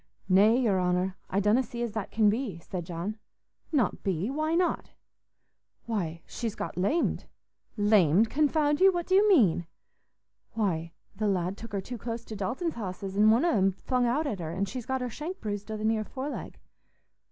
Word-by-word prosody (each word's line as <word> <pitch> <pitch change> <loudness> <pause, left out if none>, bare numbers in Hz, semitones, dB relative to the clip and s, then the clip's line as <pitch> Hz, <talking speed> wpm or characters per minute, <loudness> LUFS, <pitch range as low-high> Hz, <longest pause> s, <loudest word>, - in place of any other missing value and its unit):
"Nay, 205 +5 +5
your 205 -7 +2
honour, 180 +1 0
I 195 - +1
donna 210 +5 +3
see 240 -1 -5
as 235 - -2
that 210 -2 -4
can 220 -1 +3
be," 215 -3 0
said 175 0 -6
John. 185 +6 -4 0.5
"Not 275 -9 +1
be? 190 +4 -1
Why 310 +3 0
not?" 355 +1 0 1.0
"Why, 170 -8 -3
she's 230 -3 -4
got - - -5
lamed." 205 - 0 0.5
"Lamed, 205 -2 +4
confound 295 +1 +2
you! 385 0 +7
What 350 -2 -2
do 375 - -1
you 410 +2 +5
mean?" 190 - +4 0.9
"Why, 170 -7 -1 0.3
th' - - -10
lad 190 -3 0
took 230 +2 -10
her 200 - -1
too 245 +4 -7
close 230 +1 -5
to 220 - -7
Dalton's 250 - -2
hosses, 195 -3 -5
an' 210 +2 +5
one 230 +8 +4
on 345 - +3
'em 195 -3 +3
flung 250 +5 0
out 285 +7 +1
at 215 -10 -2
her, 160 -2 -4
an' 195 +3 -1
she's 235 +4 -6
got 265 0 -1
her 250 - -2
shank 340 - -6
bruised 205 -1 -5
o' 215 - -3
the 215 - -3
near 220 -1 +1
foreleg." 270 +6 -6
215 Hz, 190 wpm, -28 LUFS, 190-260 Hz, 1.0 s, you